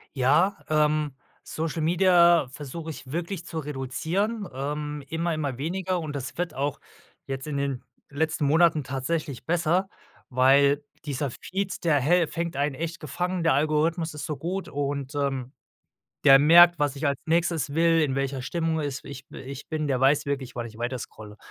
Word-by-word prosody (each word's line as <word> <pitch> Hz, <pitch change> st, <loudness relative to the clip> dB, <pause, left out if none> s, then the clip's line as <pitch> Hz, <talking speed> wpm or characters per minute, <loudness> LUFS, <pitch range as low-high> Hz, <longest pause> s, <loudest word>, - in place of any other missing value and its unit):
Ja, 150 Hz, +10 st, +3 dB
ähm, 150 Hz, -1 st, +2 dB, 0.3 s
Social-Media 170 Hz, 0 st, +3 dB
versuche 150 Hz, +4 st, -7 dB
ich 135 Hz, -4 st, -9 dB
wirklich 170 Hz, +1 st, -4 dB
zu 160 Hz, -, -4 dB
reduzieren, 160 Hz, -, -2 dB
ähm, 150 Hz, +2 st, -4 dB
immer 165 Hz, +3 st, -1 dB
immer 145 Hz, -5 st, -3 dB
weniger, 180 Hz, +5 st, -2 dB
und 155 Hz, -3 st, -5 dB
das 135 Hz, 0 st, -5 dB
wird 175 Hz, -3 st, -2 dB
auch 140 Hz, +2 st, -2 dB, 0.5 s
jetzt 135 Hz, +1 st, -5 dB
in 145 Hz, -, -3 dB
den 140 Hz, -3 st, -2 dB, 0.3 s
letzten 150 Hz, 0 st, -1 dB
Monaten 160 Hz, 0 st, +4 dB
tatsächlich 135 Hz, +1 st, -3 dB
besser. 175 Hz, +3 st, +1 dB, 0.4 s
Weil 140 Hz, +3 st, +4 dB, 0.2 s
dieser 145 Hz, -1 st, -2 dB
Feed, 190 Hz, +7 st, -4 dB
der 150 Hz, -3 st, +4 dB
häl 170 Hz, +5 st, +3 dB
fängt 165 Hz, -1 st, -4 dB
einen 140 Hz, 0 st, 0 dB
echt 165 Hz, +3 st, -4 dB
gefangen, 175 Hz, +4 st, -2 dB
der 165 Hz, -, +4 dB
Algorithmus 155 Hz, +3 st, +1 dB
ist 150 Hz, -, -6 dB
so 150 Hz, -, -3 dB
gut 180 Hz, +7 st, -4 dB
und, 140 Hz, 0 st, -3 dB
ähm, 135 Hz, -2 st, -2 dB, 0.7 s
der 135 Hz, -1 st, +10 dB
merkt, 170 Hz, +3 st, +7 dB
was 145 Hz, -1 st, 0 dB
ich 145 Hz, -, 0 dB
als 140 Hz, -1 st, 0 dB
Nächstes 165 Hz, -3 st, +1 dB
will, 165 Hz, 0 st, +4 dB
in 145 Hz, -4 st, +1 dB
welcher 135 Hz, -1 st, -2 dB
Stimmung 160 Hz, +3 st, -1 dB
es 140 Hz, -2 st, -3 dB
ich 140 Hz, 0 st, -9 dB
bi -, -, -10 dB
ich 135 Hz, +1 st, -9 dB
bin. 155 Hz, -2 st, -2 dB
Der 130 Hz, -2 st, 0 dB
weiß 145 Hz, +2 st, +4 dB
wirklich, 140 Hz, -3 st, -3 dB
wann 120 Hz, -1 st, -3 dB
ich 110 Hz, -1 st, -13 dB
weiterscrolle. 115 Hz, -3 st, -6 dB
150 Hz, 165 wpm, -26 LUFS, 140-165 Hz, 0.7 s, der